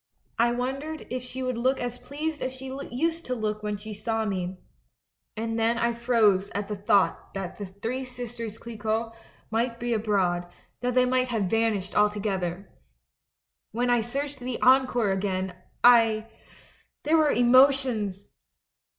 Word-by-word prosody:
I 235 +1 +4
wondered 270 +6 -3
if 255 0 -2
she 255 +1 -5
would 255 -2 -2
look 260 +2 +2
as 245 0 -4
pleased 295 +5 -4
as 255 - -1
she 265 0 -6
used 330 +6 -1
to 255 - -1
look 215 -2 -2
when 210 -1 -2
she 215 +1 -8
saw 220 +1 -2
me 185 -2 -3 0.4
— - - -54
and 225 +1 -2
then 230 +1 +2
I 235 0 +1
froze 225 -5 +3
at 205 0 -2
the 210 - -3
thought 200 0 +1
that 195 0 -5
The 205 +6 -4
Sisters 240 -3 -6
Clicquot 225 0 -3 0.4
might 230 +1 0
be 240 0 -1
abroad, 185 -5 0 0.3
that 250 0 -1
they 255 0 +5
might 255 0 +2
have 225 -4 0
vanished 210 -1 0
altogether. 200 -3 0 1.1
When 245 +2 +1
I 240 -1 +4
searched 275 +4 -4
the 250 0 -4
Encore 250 -4 +4
again, 190 -1 -2 0.3
I 225 -2 +5 0.7
There 315 +2 +3
were 310 -2 +4
emotions 245 -6 +3
230 Hz, 150 wpm, -27 LUFS, 210-250 Hz, 1.1 s, they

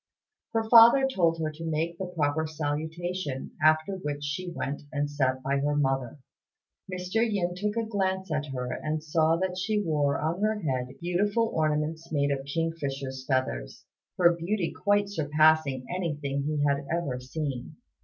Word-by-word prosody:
Her 225 -1 0
father 235 +4 +8
told 170 -10 +2
her 155 -1 -1
to 155 +2 -9
make 165 +2 -2
the 190 - -3
proper 160 -2 0
salutation, 155 0 -3
after 155 +4 +4
which 145 -5 -4
she 145 +6 -3
went 145 -4 -4
and 145 -1 0
sat 130 -3 0
by 140 +1 +1
her 145 +1 0
mother. 135 -3 0 0.7
Mr. 185 +3 -3
Yin 200 -6 0
took 205 +4 -2
a 230 -1 0
glance 190 -4 -1
at 150 -1 -1
her, 125 -2 -4
and 155 0 -3
saw 160 +1 +2
that 185 0 -2
she 210 +3 0
wore 150 -7 +1
on 165 +5 -1
her 215 0 +1
head 130 -4 -2
beautiful 205 +6 +1
ornaments 155 +1 -1
made 145 -2 +1
of 135 -1 -1
kingfisher's 140 -4 -3
feathers, - - -2 0.3
her 175 -1 +6
beauty 170 +2 -1
quite 205 0 +2
surpassing 155 -6 +2
anything 145 -6 -2
he 150 -1 0
had 140 0 +1
ever 160 -7 -1
seen. 135 +1 -5
155 Hz, 160 wpm, -28 LUFS, 145-180 Hz, 0.7 s, father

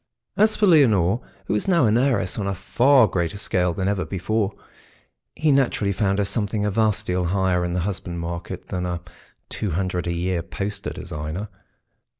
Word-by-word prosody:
As 215 +1 +4
for 210 - +2
Leonore, 115 - +4 0.2
who - - -1
was 105 - -1
now 170 -8 +4
an 110 0 +3
heiress 120 -7 +1
on 100 - -2
a 100 - -1
far 125 +7 +4
greater 90 0 -2
scale 90 -3 +1
than 95 +3 -2
ever 100 -2 0
before, 100 +5 -1 0.8
he 155 -1 +2
naturally 125 -7 +2
found 100 0 0
her 100 - +1
something 105 0 -1
a 105 - 0
vast 110 0 +1
deal 90 -1 0
higher 90 0 +1
in 90 0 -2
the 90 - 0
husband 90 -2 -4
market 85 +1 -6
than 90 -1 -2
a 90 -1 -3 0.5
two 105 - -3
hundred 90 +1 -2
a - - 0
year 90 0 -1
poster 100 +4 -4
designer. 80 +8 -5
100 Hz, 180 wpm, -23 LUFS, 90-110 Hz, 0.8 s, As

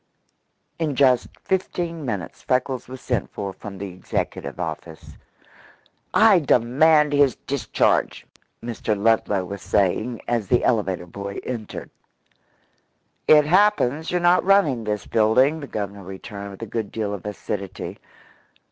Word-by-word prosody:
In 155 -4 -1
just 130 -2 +4 0.2
fifteen 175 -3 -2
minutes 105 -8 -4
Freckles 130 -1 -1
was 130 0 -9
sent 125 -5 -2
for 100 -2 -5
from 100 0 -9
the 100 +1 -5
executive 90 - -4
office. 80 -2 -6 1.0
"I 215 -4 +6
demand 150 +3 +4
his 145 -2 +4
discharge!" 140 -2 0 0.4
Mr. 115 -2 -2
Ludlow 105 -3 +2
was 100 +2 -7
saying 110 +5 0
as 115 -4 0
the 120 - +2
elevator 95 -6 0
boy 100 +3 -7
entered. 115 -4 -6 1.4
"It 150 -1 +7
happens 165 -5 +3
you're 180 - +1
not 175 +1 +4
running 160 - +3
this 105 -1 -2
building," 125 +8 +3
the 140 - -7
Governor 100 -3 -5
returned 100 +2 -8
with 100 +3 -9
a - - -3
good 110 -1 -4
deal 105 -2 -2
of 100 - -6
acidity. 100 -2 -5
120 Hz, 130 wpm, -23 LUFS, 100-145 Hz, 1.4 s, It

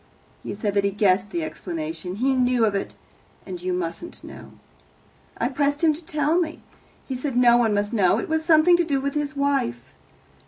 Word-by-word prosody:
He - - -6
said 205 -1 -2
that 200 0 +2
he 200 - +2
guessed 200 -1 +2
the 340 +5 -3
explanation 315 - -5
he 260 +6 +1
knew 250 -2 +2
of 210 - 0
it, 195 - -3 0.5
and 180 -3 -7
you 185 +1 -2
mustn't 180 - -5
know. - - -11 0.8
I 235 - 0
pressed 285 +3 -1
him 315 -2 +5
to 320 +4 -9
tell 310 0 +1
me. 320 -2 -3 0.4
He 265 - -3
said 255 0 -3
no 240 -1 +6
one 225 -3 +2
must 205 +2 -1
know; 195 -3 +3
it 225 - -3
was 320 0 0
something 325 +1 +5
to 345 - +2
do 285 -4 0
with 280 +1 -2
his 295 0 -2
wife. 130 - -1
255 Hz, 200 wpm, -23 LUFS, 205-310 Hz, 0.8 s, no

